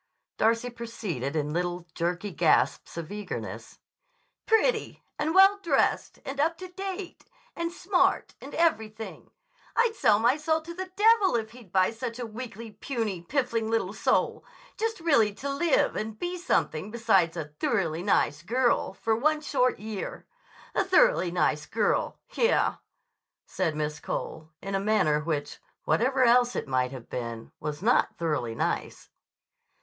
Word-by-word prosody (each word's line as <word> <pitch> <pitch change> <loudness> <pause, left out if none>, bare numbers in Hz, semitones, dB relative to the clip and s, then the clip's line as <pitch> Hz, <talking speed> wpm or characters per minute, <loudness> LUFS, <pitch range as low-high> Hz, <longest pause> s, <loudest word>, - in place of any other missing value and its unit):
Darcy 230 +2 +2
proceeded 205 - -4
in 150 -1 -1
little, 175 0 -2
jerky 175 +4 -2
gasps 165 +1 +2
of 165 0 -5
eagerness. 210 0 -6 0.7
"Pretty. 445 +1 +1 0.2
And 315 +3 0
well 390 +1 +7
dressed. 315 -8 +1
And 270 +1 -5
up 325 +3 +2
to 370 0 -8
date. 385 0 -6 0.3
And 335 0 -2
smart. 365 +1 +1
And - - -9
everything! 220 -10 -1 0.5
I'd 465 -1 +3
sell 220 - +4
my 240 +6 +3
soul 315 +1 +1
to 340 +2 -8
the 370 +2 -6
devil 420 - +5
if 220 -1 -2
he'd 235 -6 -15
buy 185 +1 +3
such 230 +1 -5
a 245 - -4
weakly, 225 -1 -8
puny, 210 -4 -3
piffling 230 +1 -1
little 225 -4 0
soul, - - +1 0.3
just 450 -1 -2
really 230 -11 +3
to 280 - -6
live 320 +2 +2
and 215 0 -4
be 355 +6 -3
something 210 - 0
besides 205 -7 +2
a 160 - -3
'thoroughly 165 +1 -1
nice 150 -6 +1
girl' 235 0 +1
for 225 +2 0
one 305 +6 +2
short 255 -4 +1
year. 215 -2 -6 0.5
'A - - +2
thoroughly - - +4
nice 155 -4 0
girl'! 215 -1 0 0.2
Yah!" 470 0 +2 0.7
said 170 -5 -1
Miss 150 0 -2
Cole 155 +1 -5
in 195 +1 -4
a 195 - +1
manner 195 -8 +2
which, 150 -2 -3 0.2
whatever 260 +2 +2
else 245 0 +4
it - - -3
might 130 -1 +1
have 130 -3 -9
been, 115 -2 -6
was 150 +3 -5
not 240 +3 +3
thoroughly 150 -9 -1
nice. - - -3
225 Hz, 150 wpm, -27 LUFS, -, 0.7 s, well